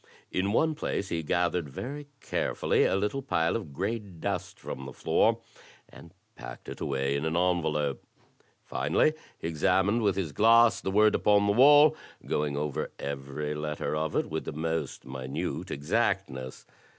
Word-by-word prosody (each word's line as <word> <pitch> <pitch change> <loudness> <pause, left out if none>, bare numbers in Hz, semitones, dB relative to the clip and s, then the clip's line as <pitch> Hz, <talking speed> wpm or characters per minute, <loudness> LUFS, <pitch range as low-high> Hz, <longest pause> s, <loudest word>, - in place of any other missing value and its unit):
In 95 +2 0
one 160 +8 +2
place 100 -9 -3
he 85 - -1
gathered 85 0 0
very 140 - -6
carefully - - +1
a - - +2
little 105 +8 -1
pile 85 -10 0
of 100 -10 -4
gray 100 +10 -2
dust 95 -6 -5
from 65 0 -7
the 65 - -8
floor, - - +2 0.5
and - - -14 0.2
packed - - -10
it - - -8
away 70 0 -1
in 70 - -2
an 80 +1 0
envelope. 80 -5 0 0.6
Finally 75 - +1 0.2
he - - -5
examined 95 +7 +2
with 100 -3 +2
his 95 -6 -2
glass 115 +7 +5
the - - -2
word 105 +2 +4
upon 105 -1 +3
the 100 - +3
wall, 145 +5 +7 0.3
going 75 -1 -1
over 75 -1 -2
every 70 +2 -4
letter 75 0 -3
of 80 0 -2
it - - +2
with 80 0 -3
the - - -5
most 80 -2 -3
minute 65 0 -4
exactness. 75 - -2
85 Hz, 160 wpm, -28 LUFS, 75-105 Hz, 0.6 s, wall